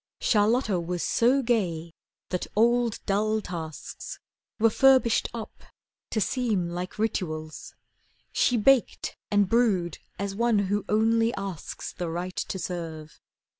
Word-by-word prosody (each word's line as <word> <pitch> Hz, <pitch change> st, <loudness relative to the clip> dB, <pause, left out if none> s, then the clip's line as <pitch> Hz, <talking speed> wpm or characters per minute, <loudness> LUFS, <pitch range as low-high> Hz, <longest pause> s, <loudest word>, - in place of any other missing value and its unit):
Charlotta 215 Hz, -2 st, +2 dB
was 175 Hz, 0 st, -3 dB
so 260 Hz, +4 st, +3 dB
gay 170 Hz, -9 st, 0 dB, 0.4 s
that 180 Hz, -, -2 dB
old, 235 Hz, +1 st, +3 dB
dull 215 Hz, +2 st, +1 dB
tasks 160 Hz, -7 st, -7 dB, 0.4 s
Were 225 Hz, 0 st, +4 dB
furbished 260 Hz, -2 st, +4 dB
up 230 Hz, -2 st, -8 dB, 0.5 s
to 220 Hz, -, -1 dB
seem 215 Hz, -7 st, 0 dB
like 180 Hz, +1 st, -5 dB
rituals. 155 Hz, -8 st, -3 dB, 0.6 s
She 245 Hz, -, +2 dB
baked 255 Hz, +3 st, +2 dB
and 205 Hz, -2 st, +3 dB
brewed 195 Hz, -7 st, +1 dB, 0.2 s
as 200 Hz, +1 st, -3 dB
one 230 Hz, +1 st, +2 dB, 0.2 s
who 205 Hz, -, 0 dB
only 225 Hz, +2 st, +3 dB
asks 195 Hz, -4 st, -6 dB
The 175 Hz, -2 st, -4 dB
right 175 Hz, +2 st, -4 dB
to -, -, -3 dB
serve. 165 Hz, -4 st, -6 dB
205 Hz, 125 wpm, -27 LUFS, 175-230 Hz, 0.6 s, Were